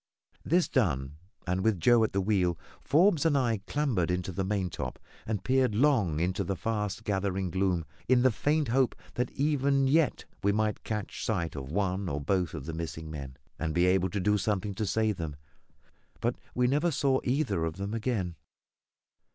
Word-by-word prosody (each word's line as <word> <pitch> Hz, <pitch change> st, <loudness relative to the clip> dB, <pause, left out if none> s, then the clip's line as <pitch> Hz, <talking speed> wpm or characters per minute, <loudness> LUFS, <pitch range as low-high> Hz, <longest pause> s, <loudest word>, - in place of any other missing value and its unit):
This 175 Hz, +3 st, +2 dB
done, 75 Hz, -, 0 dB, 0.3 s
and 90 Hz, +1 st, -1 dB
with 110 Hz, -4 st, +2 dB
Joe 120 Hz, +5 st, +5 dB
at 110 Hz, -, +1 dB
the 100 Hz, -, 0 dB
wheel, 95 Hz, -4 st, +1 dB, 0.3 s
Forbes 165 Hz, +1 st, +4 dB
and 160 Hz, -4 st, +3 dB
I 115 Hz, -6 st, +1 dB
clambered 125 Hz, -, 0 dB
into 90 Hz, +1 st, -1 dB
the 95 Hz, +2 st, -2 dB
maintop 90 Hz, -10 st, -2 dB, 0.3 s
and 105 Hz, -3 st, -2 dB
peered 130 Hz, -4 st, +2 dB
long 110 Hz, -, +3 dB
into 90 Hz, +2 st, 0 dB
the 95 Hz, -, -2 dB
fast 105 Hz, +1 st, -2 dB
gathering 95 Hz, -3 st, -1 dB
gloom, 95 Hz, -3 st, 0 dB, 0.2 s
in 125 Hz, -1 st, +4 dB
the 130 Hz, -, +5 dB
faint 145 Hz, +5 st, 0 dB
hope 130 Hz, +1 st, +2 dB, 0.2 s
that 125 Hz, 0 st, -1 dB
even 140 Hz, -1 st, +2 dB
yet 155 Hz, +1 st, +2 dB, 0.2 s
we 100 Hz, -, +3 dB
might 110 Hz, +1 st, 0 dB
catch 105 Hz, -2 st, -4 dB
sight 85 Hz, -8 st, -1 dB
of 70 Hz, 0 st, -6 dB
one 95 Hz, 0 st, -1 dB
or 70 Hz, -, -2 dB
both 90 Hz, +3 st, 0 dB
of 75 Hz, -4 st, -6 dB
the 80 Hz, -, -5 dB
missing 80 Hz, -1 st, -5 dB
men, 70 Hz, -4 st, -7 dB, 0.2 s
and 80 Hz, -1 st, -2 dB
be 90 Hz, +1 st, +4 dB
able 95 Hz, 0 st, +3 dB
to 100 Hz, -, -2 dB
do 105 Hz, +2 st, +2 dB
something 100 Hz, 0 st, -1 dB
to 105 Hz, +1 st, -2 dB
save 110 Hz, 0 st, +1 dB
them; 80 Hz, -4 st, -4 dB, 0.8 s
but -, -, 0 dB, 0.2 s
we 125 Hz, -, +2 dB
never 145 Hz, +7 st, +2 dB
saw 140 Hz, -3 st, +2 dB
either 130 Hz, -, 0 dB
of 80 Hz, +1 st, -3 dB
them 100 Hz, +2 st, -4 dB
again. 110 Hz, -6 st, -1 dB
100 Hz, 185 wpm, -29 LUFS, 90-125 Hz, 0.8 s, Joe